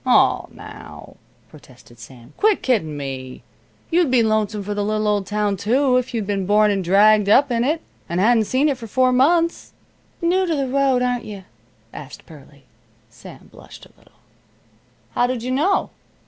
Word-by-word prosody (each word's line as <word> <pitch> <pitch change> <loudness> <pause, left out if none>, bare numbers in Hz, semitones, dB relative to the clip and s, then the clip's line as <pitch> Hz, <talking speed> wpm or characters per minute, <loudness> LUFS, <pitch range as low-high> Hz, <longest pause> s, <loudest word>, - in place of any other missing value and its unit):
"Oh, - - +2
now," - - -12 0.3
protested 120 -2 -18
Sam, 120 +3 -14
"quit 425 -1 +1
kiddin' 160 - -1
me! 130 -2 -7 0.5
You'd 340 -3 +2
be 250 -2 +3
lonesome 215 -1 -1
for 205 +1 -4
the 205 0 -2
little 215 +1 -1
old 205 -2 0
town, 210 0 -1
too, 250 +6 +1
if 255 0 -2
you'd 225 -4 -3
been 195 -2 -3
born 210 +1 +3
and 195 -2 -1
dragged 205 +3 +4
up 270 +5 +4
in 235 0 0
it, 310 +5 -1 0.3
and 170 +1 -2
hadn't 225 +2 +3
seen 265 +7 +1
it 275 -4 -1
for 230 - -8
four 255 +4 +2
months." 330 +7 +1 0.5
"New 365 +2 +1
to 330 - 0
the 275 -2 -2
road, 265 -1 +1
aren't 245 -1 -2
you?" 200 -3 -9 0.5
asked - - -11
Pearlie. - - -17 0.5
Sam - - -14
blushed - - -14
a - - -21
little. - - -27 0.9
"How 245 - +1
did 250 -2 -4
you 255 - -3
know?" 320 +10 0
220 Hz, 175 wpm, -20 LUFS, 200-260 Hz, 0.9 s, dragged